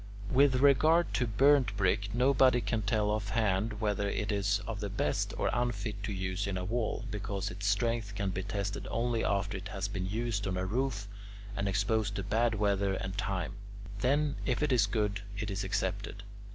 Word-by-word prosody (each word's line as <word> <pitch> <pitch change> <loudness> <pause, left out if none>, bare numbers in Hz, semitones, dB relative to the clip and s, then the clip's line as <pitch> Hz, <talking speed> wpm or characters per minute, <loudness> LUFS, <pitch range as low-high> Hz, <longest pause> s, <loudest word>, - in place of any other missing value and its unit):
With 135 0 +5
regard 150 +6 +4
to 125 - +1
burnt 130 -1 +4
brick, 100 +1 +1
nobody 125 +1 +4
can 115 -2 -1
tell 105 0 +1
offhand 105 0 0
whether 105 -2 0
it 105 +1 -2
is 100 0 +1
of 110 -2 -4
the 105 -1 -3
best 105 - -1
or - - +1
unfit 110 -4 -2
to 100 - -3
use 95 +1 -2
in 95 -1 -2
a 90 - -3
wall, 115 +2 -2
because 100 -1 -3
its 100 +3 -4
strength 110 0 0
can 100 -1 -1
be 95 - -3
tested 100 +1 -3
only 115 0 0
after 100 0 0
it 95 - -8
has 100 -2 -3
been 95 -2 -3
used 110 -1 -2
on 95 -1 -1
a 95 - -1
roof 110 0 -1 0.5
and 100 0 -1
exposed 105 +3 0
to 100 - -2
bad 115 +3 +1
weather 100 -2 +1
and 95 0 -4
time 95 -4 -2 0.5
then, 145 +4 +1
if 130 +3 0
it 150 - +1
is 115 -6 +4
good 105 -1 -1 0.2
it 105 0 -3
is 100 +1 -2
accepted. 100 +1 -2
105 Hz, 190 wpm, -31 LUFS, 100-115 Hz, 0.5 s, With